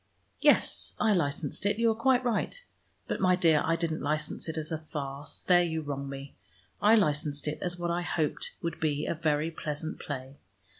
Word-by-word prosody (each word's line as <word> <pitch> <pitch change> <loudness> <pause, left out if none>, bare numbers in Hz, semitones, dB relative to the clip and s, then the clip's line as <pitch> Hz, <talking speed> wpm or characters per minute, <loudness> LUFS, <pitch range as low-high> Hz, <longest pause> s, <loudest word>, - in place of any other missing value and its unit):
"Yes, - - +3
I 215 - +4
licensed 145 -4 0
it, 205 +1 +1
you 230 0 +3
are - - -1
quite 255 +2 +3
right. 245 - -1 0.4
But, - - -2
my 185 -1 +5
dear, 165 -4 +4
I 165 - +2
didn't 165 -1 -2
license 155 +2 -1
it 160 - -4
as 155 0 -3
a 160 - -2
farce; 145 -2 -5
there 180 -1 +5
you 160 -2 -1
wrong 140 -1 -4
me. 140 0 -7 0.5
I 215 +2 +6
licensed 150 -6 +1
it 150 - -2
as 180 -1 -1
what 175 -1 -1
I 175 +1 0
hoped 160 -3 -2
would 170 - -3
be 150 -1 0
a - - 0
very 155 0 0
pleasant 155 0 -4
play. 135 -1 -6
160 Hz, 195 wpm, -29 LUFS, 145-175 Hz, 0.5 s, I